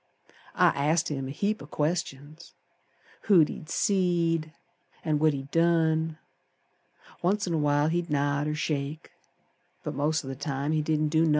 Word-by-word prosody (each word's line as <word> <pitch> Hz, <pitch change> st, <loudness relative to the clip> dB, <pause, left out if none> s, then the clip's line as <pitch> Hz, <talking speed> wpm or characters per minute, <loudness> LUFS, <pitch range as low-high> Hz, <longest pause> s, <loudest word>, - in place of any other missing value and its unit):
I -, -, +5 dB
asked 155 Hz, +4 st, +1 dB
him 135 Hz, -3 st, -3 dB
a -, -, -5 dB
heap 205 Hz, +8 st, -1 dB
o' 140 Hz, -, -9 dB
questions; 150 Hz, -1 st, -3 dB, 0.7 s
Who 195 Hz, -6 st, +6 dB
he'd 155 Hz, +1 st, -2 dB
seed 170 Hz, -4 st, +1 dB, 0.5 s
An' 155 Hz, -2 st, +1 dB
what 155 Hz, 0 st, +4 dB
he'd 135 Hz, 0 st, -6 dB
done. 160 Hz, -1 st, +2 dB, 1.0 s
Once 205 Hz, +4 st, +1 dB
in 175 Hz, -, -2 dB
a -, -, +1 dB
while 145 Hz, 0 st, +2 dB
he'd 170 Hz, +1 st, -1 dB
nod 145 Hz, 0 st, 0 dB
or 150 Hz, -, -1 dB
shake, 150 Hz, 0 st, -3 dB, 0.7 s
But -, -, -4 dB
most 150 Hz, +2 st, 0 dB
o' 135 Hz, -, -4 dB
th' 130 Hz, -, -12 dB
time 140 Hz, 0 st, -2 dB
he 155 Hz, -1 st, +1 dB
didn't 155 Hz, 0 st, 0 dB
do 160 Hz, +1 st, +2 dB
nothin'. 165 Hz, 0 st, +3 dB
155 Hz, 165 wpm, -27 LUFS, 145-165 Hz, 1.0 s, Who